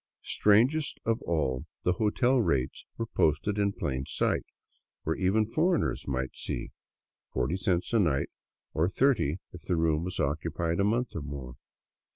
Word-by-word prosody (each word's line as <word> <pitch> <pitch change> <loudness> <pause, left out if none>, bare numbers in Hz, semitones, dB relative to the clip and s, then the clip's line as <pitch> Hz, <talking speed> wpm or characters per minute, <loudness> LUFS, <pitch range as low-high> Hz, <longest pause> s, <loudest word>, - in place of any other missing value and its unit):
Strangest 125 +9 +3
of 115 0 +1
all, 70 -7 0 0.2
the 90 - +3
hotel 120 +4 +3
rates 65 - 0
were 115 - -1
posted 80 +1 +1
in 100 -1 +2
plain 65 -8 -2
sight, - - 0 0.6
where 80 - 0
even 100 +4 +2
foreigners 165 - +1
might 65 -1 -2
see; - - -4 0.6
forty 65 +7 0
cents 95 +1 0
a 115 - +5
night, 75 -8 +2 0.4
or 80 +3 +2
thirty 100 - +2 0.2
if 90 - -9
the 90 - -1
room 80 -1 +2
was 90 +1 -3
occupied 80 +4 -1
a - - +4
month 115 +5 +1
or 85 - -2
more. 70 -3 -6
90 Hz, 155 wpm, -29 LUFS, 75-110 Hz, 0.6 s, a